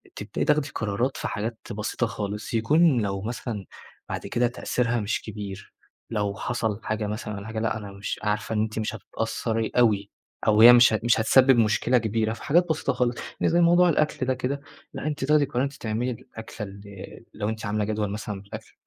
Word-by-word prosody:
تبدئي - - -3
تاخدي 150 -1 +2
قرارات 110 +5 -1
في - - -3
حاجات 110 +2 -4
بسيطة 110 +3 -2
خالص، 105 -1 -5
يكون 140 +4 +4
لو 100 -2 -2
مثلًا 110 -2 -5 0.4
بعد - - -4
كده 120 0 +1
تأثيرها 120 -1 -1
مش 105 +1 -1
كبير، 100 -2 -8 0.4
لو 105 -3 -1
حصل 110 -4 -2
حاجة 105 0 -2
مثلًا 105 0 -4
والّا 100 +2 -7
حاجة، 110 0 -4
لأ، 110 0 0
أنا 105 -2 -8
مش 100 0 -5
عارفة 105 +1 -1
إن 105 - +2
أنتِ 110 0 -2
مش 110 0 -2
هتتأثّري 115 +1 -3
أوي 105 -4 +3 0.4
أو 105 0 +5
هي 120 +1 +11
مش 120 -2 +7
هت 110 - -1
مش 120 -1 +3
هتسبب 130 +3 +5
مشكلة 115 +3 +3
كبيرة، 110 0 0
في - - -10
حاجات 175 +4 +3
بسيطة 155 -3 0
خالص، 125 -1 0 0.3
يعني - - +3
زي 175 - +4
موضوع 175 +1 +5
الأكل 150 -3 +1
ده 130 - +1
كده، 135 +3 -3 0.3
لأ، - - -4
أنتِ 145 -3 -2
تاخدي 150 +1 +4
القرار 130 -2 -1
أنتِ 140 +1 -2
تعملي 120 0 -2
الأكلة 110 -2 -8
ال 100 +1 -11 0.5
لو 105 0 -2
أنتِ 110 0 -5
عاملة 105 +1 0
جدول 105 -1 -1
مثلًا 105 -1 -5
بالأكل، 100 - -10
110 Hz, 195 wpm, -25 LUFS, 105-125 Hz, 0.5 s, هي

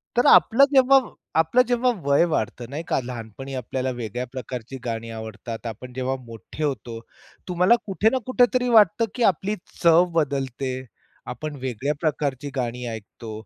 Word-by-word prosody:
तर 245 - +3
आपलं 270 +5 +7
जेव्हा 270 0 +7 0.4
आपलं 165 +11 +4
जेव्हा 245 +1 +2 0.2
वय 140 +3 +4
वाढतं 115 +2 -2
नाही 150 +4 -5
का, - - +1
लहानपणी 125 +2 -7
आपल्याला 130 +1 -3
वेगळ्या 120 +2 -4
प्रकारची 130 0 -6
गाणी 115 0 -4
आवडतात 110 +1 -7
आपण 125 +3 -8
जेव्हा 130 +1 -2
मोठे 115 +6 -8
होतो, 120 -5 -3 0.5
तुम्हाला 180 +6 +4
कुठे 210 +2 +2
ना 260 - 0
कुठेतरी 250 -1 +2
वाटतं, 230 +3 +5
की 245 - 0
आपली 205 +3 -4 0.3
चव 170 +1 +6
बदलते. 135 -4 -1 0.5
आपण 150 +4 -6
वेगळ्या 130 +4 -1
प्रकारची 145 -3 -1
गाणी 125 -1 -3
ऐकतो, 110 0 -8
135 Hz, 145 wpm, -24 LUFS, 120-180 Hz, 0.5 s, आपलं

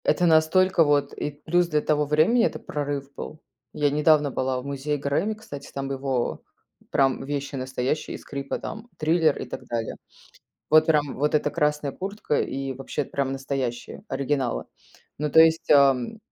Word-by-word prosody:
Это 180 - +3
настолько 165 +2 +4
вот 145 -2 +1
и 150 - -3
плюс 165 +5 0
для 150 -2 +1
того 150 -1 +1
времени, 160 +12 +3
это - - -2
прорыв 140 -1 -4
был. 155 - -7 0.3
Я 145 -1 +2
недавно 150 -1 +3
была 130 0 -1
в 125 - -9
музее 140 +1 -2
"Грэмми", 145 +10 -1
кстати, 145 -10 -10
там 135 0 -4
его 135 -2 -2 0.5
прям 135 -1 +2
вещи 140 0 -4
настоящие, 130 +2 -2
и - - -6
скрипы 140 -1 -5
там, 220 +2 -7
"Триллер" 160 -1 +2
и - - -4
так - - -7
далее. 115 -1 -3 0.8
Вот 155 0 +6
прям 150 -3 +2
вот 150 +3 +1
эта 150 -1 +1
красная 150 -3 0
куртка, 195 -2 -2
и 135 0 -3
вообще 135 +2 -4
прям 135 0 -2
настоящие 135 +2 -4
оригиналы. 135 - -1 0.5
Ну, 150 0 -1
то 160 - +7
есть, 160 0 +4
ам, 140 - +4
145 Hz, 165 wpm, -25 LUFS, 135-155 Hz, 0.8 s, то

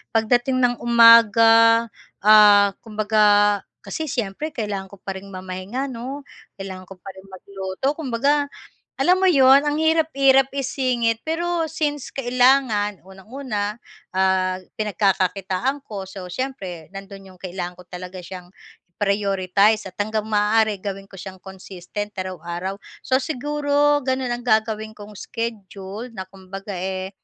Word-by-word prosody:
pagdating 245 +3 +2
ng 245 0 +3
umaga, 230 -1 +6 0.4
ah, 205 -1 +7
kumbaga 210 -2 +3 0.2
kasi 315 -1 -5
siyempre 245 +6 -4
kailangan 205 -4 -4
ko 200 - -14
pa 195 - -4
rin 200 - -14
mamahinga 190 +8 -5
'no. 260 +4 -6 0.3
Kailangan 190 -2 -8
ko 195 - -11
pa 195 - -7
ring 190 +1 -15
magluto, 190 +5 -4
kumbaga 285 0 0 0.5
alam 355 +7 +3
mo 380 - +5
'yon, 270 -2 +6
ang 295 0 -1
hirap-hirap 275 -4 +3
isingit 255 -4 -1
pero 330 0 -2
since 295 -3 -3
kailangan, 245 -6 +2
unang-una, 210 +1 -5 0.3
ah, 185 -1 +1 0.2
pinagkakakitaan 195 +4 0
ko, 195 -3 -7
so 190 -2 -8
siyempre 180 - -6
nandun 195 0 -11
yung 185 - -18
kailangan 180 -1 -6
ko 180 - -14
talaga 180 +1 -8
siyang 180 0 -10 0.4
i-prioritize 200 +1 +1
at 185 - -9
hanggang 215 0 -3
maaari 210 -1 +1
gawin 195 -1 -5
ko - - -18
siyang 190 0 -9
consistent 190 +2 -8
araw-araw. 185 0 -5 0.2
So 260 0 0
siguro, 290 0 +1
ganun 260 -1 -1
ang 240 - -7
gagawin 220 -2 0
kong 210 -1 -12
schedule 210 +1 -6
na 190 -3 -6
kumbaga, 195 +1 -9
eh, 190 +1 -4
210 Hz, 130 wpm, -22 LUFS, 190-255 Hz, 0.5 s, ah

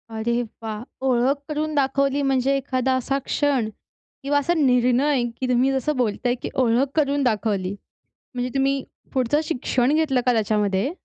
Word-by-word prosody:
अरे 235 +2 0 0.2
वाह! 215 0 -5 0.2
ओळख 260 +2 +2
करून 305 +1 -2
दाखवली, 275 0 +1
म्हणजे 270 0 +2
एखादा 260 -1 -1
असा 270 +2 -1
क्षण 275 -6 +1 0.6
किंवा 285 +1 +2
असा 345 +5 0
निर्णय, 255 -1 +3 0.2
की 260 - -1
तुम्ही 250 +2 +3
जसं 270 +3 -1
बोलताय, 245 +1 0
की 250 - -6
ओळख 255 +1 +2
करून 285 -2 +1
दाखवली. 205 -5 0 0.6
म्हणजे 250 +1 -2
तुम्ही 275 0 +1 0.3
पुढचं 260 +4 +1
शिक्षण 260 -2 0
घेतलं 285 -6 +2
का 250 - +4
त्याच्यामध्ये? 210 +2 +1
260 Hz, 145 wpm, -23 LUFS, 240-275 Hz, 0.6 s, का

